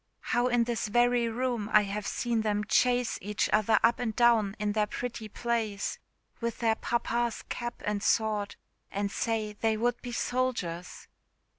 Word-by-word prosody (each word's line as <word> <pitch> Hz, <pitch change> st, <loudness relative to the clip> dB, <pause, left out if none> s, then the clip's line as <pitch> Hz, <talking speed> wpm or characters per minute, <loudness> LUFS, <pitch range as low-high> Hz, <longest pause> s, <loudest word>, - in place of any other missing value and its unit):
How 240 Hz, +1 st, +3 dB
in 245 Hz, -1 st, +3 dB
this 235 Hz, -2 st, -2 dB
very 240 Hz, +1 st, +3 dB
room 240 Hz, -2 st, -1 dB
have 210 Hz, -1 st, +3 dB
I -, -, -2 dB
seen 235 Hz, -2 st, 0 dB
them 210 Hz, -1 st, 0 dB
chase 245 Hz, +3 st, +2 dB
each 210 Hz, +2 st, -1 dB
other 215 Hz, 0 st, +4 dB
up 230 Hz, +1 st, +4 dB
and 225 Hz, -3 st, -2 dB
down 230 Hz, -5 st, +4 dB
in 210 Hz, 0 st, -1 dB
their 210 Hz, 0 st, +1 dB
pretty 235 Hz, 0 st, -5 dB
plays, 220 Hz, -3 st, -2 dB, 0.4 s
with 235 Hz, -1 st, -2 dB
their 225 Hz, -2 st, +2 dB
papa's 235 Hz, 0 st, -1 dB
cap 240 Hz, 0 st, -5 dB
and 210 Hz, -1 st, -1 dB
sword, 210 Hz, -1 st, +1 dB, 0.3 s
and 200 Hz, 0 st, -2 dB
say 220 Hz, -2 st, -1 dB
they 220 Hz, +1 st, 0 dB
would 240 Hz, +2 st, 0 dB
be 245 Hz, -, -6 dB
soldiers!" 235 Hz, -9 st, -2 dB
225 Hz, 160 wpm, -29 LUFS, 210-240 Hz, 0.4 s, other